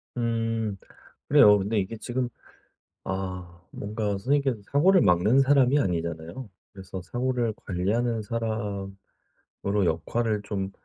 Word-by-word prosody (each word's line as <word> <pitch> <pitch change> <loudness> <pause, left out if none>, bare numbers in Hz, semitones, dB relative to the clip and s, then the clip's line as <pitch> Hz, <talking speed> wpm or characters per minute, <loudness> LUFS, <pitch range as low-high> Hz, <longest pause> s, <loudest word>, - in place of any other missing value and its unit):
음 115 -3 -1 0.5
그래요. 105 0 +7
근데 105 +3 0
이게 100 +4 -3
지금 125 +2 -2 0.7
아, 90 -2 -5
뭔가 105 +1 -3
선생님께서 130 +5 +1
사고를 180 +6 +5
막는 100 +9 +4
사람이 135 0 +4
아니잖아요. 85 - -3 0.2
그래서 95 -1 -8
사고를 120 +3 -1
관리하는 110 +6 0
사람으로 105 -4 -4 0.7
역할을 105 +7 0
좀 95 -2 -3
105 Hz, 270 characters per minute, -26 LUFS, 95-120 Hz, 0.7 s, 그래요